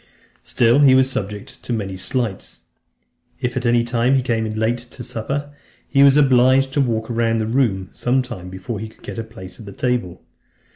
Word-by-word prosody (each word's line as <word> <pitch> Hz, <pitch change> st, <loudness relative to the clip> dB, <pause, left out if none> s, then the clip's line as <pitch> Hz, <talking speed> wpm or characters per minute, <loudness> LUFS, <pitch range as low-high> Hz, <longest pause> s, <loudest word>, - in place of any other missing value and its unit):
VIII. -, -, -32 dB
Still 120 Hz, +3 st, +3 dB
he 135 Hz, -3 st, +6 dB
was 130 Hz, 0 st, +3 dB
subjected 105 Hz, -3 st, -5 dB
to -, -, -7 dB
many 100 Hz, -5 st, -2 dB
slights. 110 Hz, +1 st, -3 dB, 0.8 s
If 125 Hz, 0 st, -2 dB
at 125 Hz, -1 st, -1 dB
any 120 Hz, 0 st, +3 dB
time 120 Hz, +2 st, +1 dB
he 130 Hz, -, +2 dB
came 115 Hz, -3 st, 0 dB
in 110 Hz, 0 st, -5 dB
late 115 Hz, +2 st, +1 dB
to 120 Hz, +1 st, -10 dB
supper, 140 Hz, +6 st, -4 dB, 0.3 s
he 140 Hz, -, +3 dB
was 140 Hz, 0 st, +7 dB
obliged 135 Hz, -1 st, +4 dB
to 145 Hz, -, +2 dB
walk 115 Hz, -4 st, 0 dB
round 115 Hz, -1 st, 0 dB
the 110 Hz, -, -1 dB
room 110 Hz, -6 st, 0 dB
some 130 Hz, +2 st, +1 dB
time 110 Hz, -8 st, -8 dB
before 95 Hz, +4 st, -6 dB
he 110 Hz, +1 st, -6 dB
could -, -, -23 dB
get -, -, -6 dB
a -, -, -2 dB
place 95 Hz, -5 st, -11 dB
at 100 Hz, -3 st, -11 dB
table. 120 Hz, -9 st, -2 dB
120 Hz, 200 wpm, -20 LUFS, 110-130 Hz, 0.8 s, was